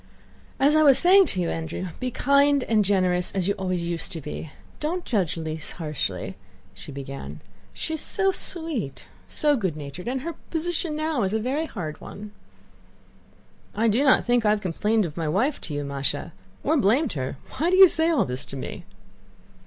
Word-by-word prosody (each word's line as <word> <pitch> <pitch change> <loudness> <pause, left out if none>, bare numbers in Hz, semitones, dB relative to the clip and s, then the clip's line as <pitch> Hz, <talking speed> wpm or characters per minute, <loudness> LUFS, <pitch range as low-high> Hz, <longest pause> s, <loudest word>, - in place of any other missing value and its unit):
"As 285 +3 +4
I 310 - +5
was 280 -4 +6
saying 375 +1 +6
to 185 - +3
you, 170 - -1
Andrew, 165 +3 -4
be 255 - -2
kind 280 +2 +3
and 220 -3 +2
generous 185 -3 +1
as 190 -2 0
you 200 - +2
always 185 -3 -2
used 170 +2 -2
to 165 - -2
be. 150 +1 -7 0.3
Don't 345 +4 -2
judge 190 -9 0
Lise 160 -1 -4
harshly," 155 -5 -4 0.4
she - - -10
began. 135 - -7 0.3
"She 320 - -4
is 315 - -2
so 390 -1 +2
sweet, 320 - -3 0.2
so 295 -1 +3
good 190 - -2
natured, 145 +6 -8
and 260 +1 -1
her 335 +4 -4 0.2
position 330 -1 -1
now 310 -3 -1
is 195 0 0
a 220 - +1
very 275 +8 -1
hard 160 - -6
one." 210 +1 -9 1.4
"I 225 +2 +2
do 230 +6 +3
not 265 -3 +4
think 245 -1 +2
I 210 - +3
have 210 0 +2
complained 210 +4 +1
of 160 -1 -7
my 165 -2 -1
wife 225 - 0
to 155 - -5
you, 145 - -2
Másha, 140 -1 -2 0.3
or 315 - +2
blamed 260 +6 +2
her. 130 -1 -4 0.2
Why 330 +4 +2
do 370 - +3
you 380 0 +10
say 325 -1 +2
all 325 - +2
this 125 0 -4
to 135 - -5
me?" 130 - -7
210 Hz, 190 wpm, -25 LUFS, -, 1.4 s, you